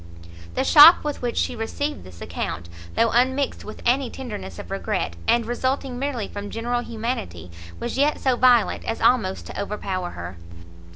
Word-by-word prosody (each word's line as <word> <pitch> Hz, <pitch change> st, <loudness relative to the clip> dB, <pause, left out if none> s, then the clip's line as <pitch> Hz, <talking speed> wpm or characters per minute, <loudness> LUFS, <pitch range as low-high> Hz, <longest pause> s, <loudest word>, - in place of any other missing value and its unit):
The -, -, +1 dB
shock 310 Hz, +4 st, +9 dB
with 295 Hz, -1 st, -4 dB
which 240 Hz, -1 st, -2 dB
she -, -, 0 dB
received 285 Hz, +6 st, -3 dB
this 90 Hz, -2 st, -14 dB
account, 85 Hz, -1 st, -5 dB, 0.3 s
though 230 Hz, -1 st, +3 dB
unmixed 260 Hz, +3 st, +1 dB
with 215 Hz, -, -10 dB
any 255 Hz, +1 st, +2 dB
tenderness 210 Hz, -, -7 dB
of -, -, -9 dB
regret, 85 Hz, -, -2 dB
and 235 Hz, -1 st, +3 dB
resulting 255 Hz, +2 st, -2 dB
merely 265 Hz, -6 st, -2 dB
from 205 Hz, 0 st, -7 dB
general 240 Hz, +2 st, -2 dB
humanity, 215 Hz, -, -5 dB, 0.3 s
was 240 Hz, +2 st, -3 dB
yet 295 Hz, +2 st, +2 dB
so 260 Hz, -2 st, +2 dB
violent 245 Hz, -2 st, +4 dB
as 225 Hz, -, -3 dB
almost 200 Hz, -7 st, +2 dB
to -, -, -5 dB
overpower 195 Hz, -3 st, -3 dB
her. 85 Hz, -, -8 dB
235 Hz, 165 wpm, -23 LUFS, 200-260 Hz, 0.3 s, shock